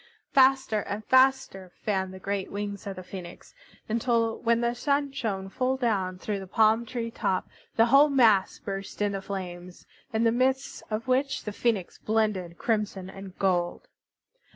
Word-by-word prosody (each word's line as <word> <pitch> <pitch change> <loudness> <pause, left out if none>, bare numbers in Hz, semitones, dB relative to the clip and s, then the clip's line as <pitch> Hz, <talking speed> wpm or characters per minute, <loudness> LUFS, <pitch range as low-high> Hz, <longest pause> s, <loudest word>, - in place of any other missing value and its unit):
Faster 265 -4 +4
and 205 +1 -5
faster 260 -8 +3
fanned 190 -3 -1
the 190 - -9
great 195 0 -3
wings 205 0 -5
of 195 - -4
the 185 - -8
Phoenix, 180 -2 -10 0.3
until 230 0 +1
when 235 0 +2
the 235 0 +1
Sun 280 +3 0
shone 200 -7 -3
full 255 +6 -1
down 195 -7 0
through 200 +2 -3
the 190 - -8
palm 220 +3 +3
tree 230 -1 -4
top, 190 -4 -1 0.3
the 225 - +5
whole 290 +2 +8
mass 225 -8 +4
burst 195 -1 -6
into 200 -2 0
flame, 180 -2 -6 0.4
in 220 +1 +1
the 230 - +4
midst 260 +3 0
of 220 +3 -3
which 270 +2 +1
the 210 - -4
Phoenix 210 -5 -1
blended 210 -6 0
crimson 205 -4 -2
and 195 -1 -10
gold. 180 - 0
215 Hz, 160 wpm, -27 LUFS, 195-240 Hz, 0.4 s, whole